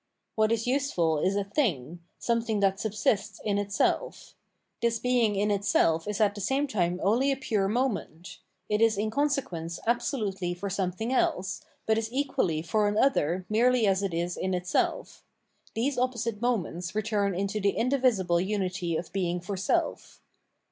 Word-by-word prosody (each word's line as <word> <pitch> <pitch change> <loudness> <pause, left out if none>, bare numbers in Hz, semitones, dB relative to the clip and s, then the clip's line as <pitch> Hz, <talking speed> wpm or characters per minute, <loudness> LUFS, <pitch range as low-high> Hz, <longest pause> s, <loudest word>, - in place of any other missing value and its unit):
What 220 0 +2
is 230 -1 0
useful 245 - +1
is 190 +5 +1
a 200 - +1
thing, 175 - -1 0.2
something 230 -2 0
that 195 0 +2
subsists 210 -1 -1
in 205 -1 +1
itself; 200 -1 -1 0.5
this 235 -1 +2
being 240 -3 +2
in 205 +1 +1
itself 165 -5 +2
is 210 -1 -2
at 210 -2 +3
the 205 - -7
same 270 +8 +1
time 180 -8 -1
only 245 +8 +3
a 270 - -1
pure 215 -7 0
moment: 210 -7 -2 0.3
it 210 +1 0
is 225 -2 +4
in 215 +2 -1
consequence 260 - -1
absolutely 210 -7 -1
for 195 +2 -5
something 195 +6 -2
else, 190 -5 0 0.2
but 220 0 +2
is 225 0 -4
equally 260 - 0
for 205 +5 +1
an 205 +1 0
other 185 - +2
merely 240 +2 +3
as 195 -1 +2
it 195 -2 -1
is 170 +1 -2
in 185 0 -1
itself: 180 0 -1 0.5
these 250 +3 0
opposite 235 -4 -1
moments 185 -6 -1
return 205 -3 0
into 200 +3 -2
the 200 0 +1
indivisible 235 -9 +2
unity 185 -4 -1
of 175 - -7
being 180 -2 -1
for 195 +3 -5
self. 190 - -1
205 Hz, 160 wpm, -28 LUFS, 185-230 Hz, 0.5 s, is